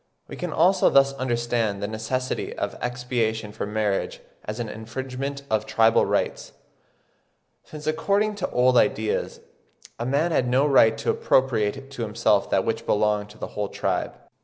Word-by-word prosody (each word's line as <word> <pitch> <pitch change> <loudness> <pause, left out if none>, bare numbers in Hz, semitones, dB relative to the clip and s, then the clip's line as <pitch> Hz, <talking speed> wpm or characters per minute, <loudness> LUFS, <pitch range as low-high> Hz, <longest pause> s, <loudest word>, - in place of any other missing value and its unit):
we - - -8
can 180 -2 -4
also 180 +5 +4
thus 135 0 +4
understand 120 -5 -1
"the 100 - -3
necessity 110 +4 -3
of - - -3
expiation 115 -3 -2
for 105 - -5
marriage 105 -2 -1 0.3
as 105 +3 -5
an 120 - -3
infringement 130 +5 -5
of 110 -3 -1
tribal 115 0 +3
rites, - - -2 1.1
since 150 -1 -10
according 200 +7 +1
to 200 -3 -3
old 125 0 +3
ideas, 110 -2 0 0.6
a 120 - -2
man 145 +6 +1
had 125 -6 +1
no 130 +3 +3
right 115 -6 +5
to 110 - 0
appropriate 130 +1 +1
to 135 - -7
himself 105 -2 +1
that - - +1
which - - -2
belonged 105 0 +1
to 105 - -15
the - - -6
whole 105 -1 -3
tribe." - - -2
120 Hz, 160 wpm, -24 LUFS, 110-135 Hz, 1.1 s, right